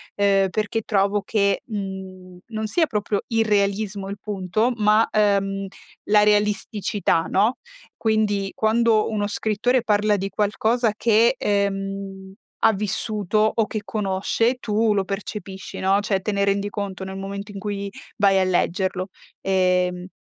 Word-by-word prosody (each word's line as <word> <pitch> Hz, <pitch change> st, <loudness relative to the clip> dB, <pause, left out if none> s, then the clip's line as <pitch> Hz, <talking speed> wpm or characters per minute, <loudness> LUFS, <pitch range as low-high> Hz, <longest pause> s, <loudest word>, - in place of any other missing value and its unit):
ehm, 195 Hz, -1 st, +3 dB
perché 215 Hz, +2 st, -1 dB
trovo 200 Hz, -1 st, +1 dB
che, 200 Hz, -2 st, +1 dB
mhmm, 190 Hz, -3 st, -7 dB
non 220 Hz, -1 st, -3 dB
sia 325 Hz, +9 st, +2 dB
proprio 210 Hz, -4 st, -2 dB
irrealismo 205 Hz, -3 st, 0 dB
il 200 Hz, -, -5 dB
punto, 210 Hz, +3 st, -1 dB
ma, 215 Hz, +1 st, +4 dB
ehm, 195 Hz, -2 st, +1 dB, 0.4 s
la 210 Hz, 0 st, +6 dB
realisticità, 210 Hz, -3 st, +1 dB
no. 215 Hz, +6 st, +2 dB, 0.4 s
Quindi, 210 Hz, -3 st, 0 dB
quando 220 Hz, 0 st, +2 dB
uno 205 Hz, -2 st, -1 dB
scrittore 220 Hz, +4 st, +1 dB
parla 210 Hz, 0 st, +2 dB
di 195 Hz, 0 st, -3 dB
qualcosa 220 Hz, +3 st, +1 dB
che, 230 Hz, +3 st, +3 dB
ehm, 195 Hz, -2 st, -2 dB, 0.3 s
ha 220 Hz, -, +6 dB
vissuto 215 Hz, +1 st, 0 dB
o 225 Hz, -2 st, +2 dB
che 215 Hz, -, -4 dB
conosce 210 Hz, +4 st, 0 dB
tu 220 Hz, -1 st, +1 dB
lo 195 Hz, -, +2 dB
percepisci, 195 Hz, -1 st, -6 dB
no, 195 Hz, +1 st, +3 dB
cioè 200 Hz, -2 st, 0 dB
te 210 Hz, -, -2 dB
ne 200 Hz, -1 st, 0 dB
rendi 200 Hz, +1 st, 0 dB
conto 195 Hz, -2 st, -4 dB
nel 190 Hz, 0 st, -6 dB
momento 200 Hz, +1 st, -6 dB
in 200 Hz, -, -7 dB
cui 200 Hz, -1 st, -4 dB, 0.3 s
vai 195 Hz, -1 st, +4 dB
a -, -, +3 dB
leggerlo. 185 Hz, +1 st, 0 dB, 0.3 s
Ehm 180 Hz, -1 st, +1 dB
205 Hz, 140 wpm, -23 LUFS, 195-215 Hz, 0.4 s, la